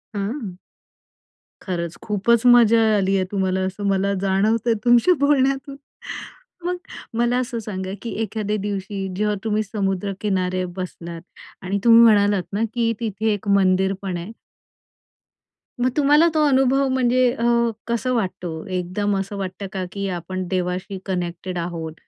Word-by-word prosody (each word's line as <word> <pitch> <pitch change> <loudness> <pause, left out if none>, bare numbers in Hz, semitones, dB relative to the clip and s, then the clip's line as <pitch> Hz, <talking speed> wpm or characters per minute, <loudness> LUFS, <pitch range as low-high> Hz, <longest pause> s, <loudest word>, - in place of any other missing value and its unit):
हं. 200 -2 -4 1.0
खरंच 170 -3 -4
खूपच 220 +3 +1
मजा 230 -2 +6 0.2
आली 195 0 +1
आहे 190 -1 +1
तुम्हाला, 190 -1 0
असं 190 +2 -5
मला 195 0 +1
जाणवतंय 215 +4 +2
तुमच्या 240 +9 +5
बोलण्यातून. 275 0 +1 0.9
मग 360 0 0 0.4
मला 240 +1 +2
असं 245 -2 -3
सांगा 190 -3 -5
की 235 - -5
एखाद्या 215 -1 -2
दिवशी 195 -1 -3
जेव्हा 210 +1 0
तुम्ही 215 -1 0
समुद्र 200 -2 -2
किनारे 185 -3 0
बसलात 170 -2 -6 0.4
आणि 200 +2 -1
तुम्ही 230 -1 +8
म्हणालात 205 -4 +4
ना 210 +3 0
की 230 -1 +1
तिथे 220 -1 -1
एक 205 0 -6
मंदिर 190 -1 +3
पण 185 -3 -3
आहे. 175 +6 -7 1.5
मग 250 - +2
तुम्हाला 295 +3 +5
तो 310 -1 +3
अनुभव 270 0 +3
म्हणजे 255 -1 +2
अ, 230 - -4 0.4
कसं 235 +2 -1
वाटतो? 180 -7 -3
एकदम 185 +3 -1
असं 195 +1 -5
वाटतं 195 +1 -5
का, 185 -1 -2
की 200 0 -3
आपण 185 +2 -5
देवाशी 185 +1 -2
कनेक्टेड 180 -1 -3
आहोत? 165 -2 -4
200 Hz, 140 wpm, -22 LUFS, 185-230 Hz, 1.5 s, तुम्ही